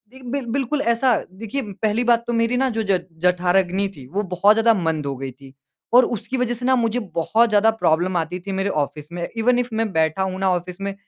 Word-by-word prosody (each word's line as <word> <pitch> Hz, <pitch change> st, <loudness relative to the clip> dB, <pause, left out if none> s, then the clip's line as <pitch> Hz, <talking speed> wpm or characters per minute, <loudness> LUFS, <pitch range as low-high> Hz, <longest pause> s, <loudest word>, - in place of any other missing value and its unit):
एक 255 Hz, -2 st, -10 dB
बिर 275 Hz, -3 st, -2 dB
बिल्कुल 275 Hz, +4 st, -1 dB
ऐसा 235 Hz, 0 st, +2 dB, 0.2 s
देखिए 225 Hz, +8 st, -5 dB, 0.2 s
पहली 220 Hz, +2 st, +1 dB
बात 235 Hz, -1 st, +3 dB
तो 240 Hz, -, -1 dB
मेरी 230 Hz, +2 st, +1 dB
ना 265 Hz, +1 st, +2 dB
जो 225 Hz, -2 st, -2 dB
ज 185 Hz, -2 st, +3 dB, 0.2 s
जठराग्नि 180 Hz, +2 st, +2 dB
थी 130 Hz, -, -11 dB
वो 200 Hz, +9 st, -2 dB
बहुत 205 Hz, +4 st, +5 dB
ज़्यादा 225 Hz, 0 st, +4 dB
मंद 160 Hz, -6 st, -1 dB
हो 140 Hz, -1 st, -3 dB
गई 135 Hz, -1 st, -5 dB
थी 135 Hz, +1 st, -16 dB, 0.4 s
और 250 Hz, 0 st, +7 dB
उसकी 245 Hz, +3 st, -4 dB
वज़ह 245 Hz, -1 st, 0 dB
से 245 Hz, +1 st, -6 dB
ना 260 Hz, -, +4 dB
मुझे 235 Hz, 0 st, 0 dB, 0.2 s
बहुत 225 Hz, +8 st, +2 dB
ज़्यादा 215 Hz, +1 st, +4 dB
प्रॉब्लम 175 Hz, +3 st, +2 dB
आती 170 Hz, +3 st, -2 dB
थी 195 Hz, +3 st, -7 dB
मेरे 195 Hz, +1 st, -1 dB
ऑफ़िस 150 Hz, +1 st, -5 dB
में 175 Hz, 0 st, -4 dB
इवेन 245 Hz, +2 st, +3 dB
इफ़ 245 Hz, -, -2 dB
मैं 225 Hz, -1 st, -1 dB
बैठा 160 Hz, +3 st, +1 dB
हूँ 190 Hz, 0 st, -3 dB
ना 190 Hz, -1 st, +2 dB
ऑफ़िस 175 Hz, +1 st, -6 dB
में 200 Hz, 0 st, -3 dB
205 Hz, 235 wpm, -21 LUFS, 175-235 Hz, 0.4 s, और